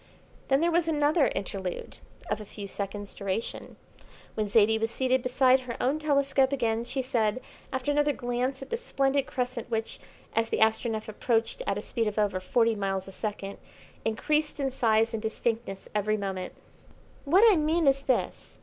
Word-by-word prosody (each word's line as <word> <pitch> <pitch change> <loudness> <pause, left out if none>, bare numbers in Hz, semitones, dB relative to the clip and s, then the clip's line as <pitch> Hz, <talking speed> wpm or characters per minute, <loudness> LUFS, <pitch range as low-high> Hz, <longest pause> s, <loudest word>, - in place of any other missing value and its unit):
Then 270 +2 +3
there 340 +1 +3
was 335 0 +2
another 300 -1 +3
interlude 190 -2 -4 0.3
of 215 - -2
a - - -5
few 205 0 -8
seconds' 200 +1 -5
duration. 200 +2 -4 0.6
When 215 -1 -1
Zaidie 220 +1 +4
was 225 0 0
seated 260 +2 +1
beside 255 +1 +4
her 250 -2 -6
own 275 +5 +1
telescope 280 -3 +2
again, 230 -4 0
she 265 +2 -2
said, 235 -3 0 0.3
after 260 +2 -1
another 295 0 +3
glance 250 +1 -2
at - - -13
the 465 - 0
splendid 275 - 0
crescent 245 -2 -3
which, 225 -1 -2 0.4
as 225 0 +1
the - - 0
Astronef 220 0 +1
approached 225 - 0
at - - 0
a - - -4
speed 230 -3 -1
of 210 - -3
over 205 -3 +1
forty 230 +5 +2
miles 195 -2 -2
a - - -8
second, 200 -1 -5 0.4
increased 300 +8 0
in 270 -1 0
size 225 -2 +2
and 225 - -2
distinctness 220 -2 -2
every 210 +1 +1
moment: 190 -2 -4 0.7
"What 355 +9 +5
I - - +3
mean 315 +1 +2
is 275 0 +4
this. 260 -3 -2
235 Hz, 175 wpm, -28 LUFS, 215-275 Hz, 0.7 s, What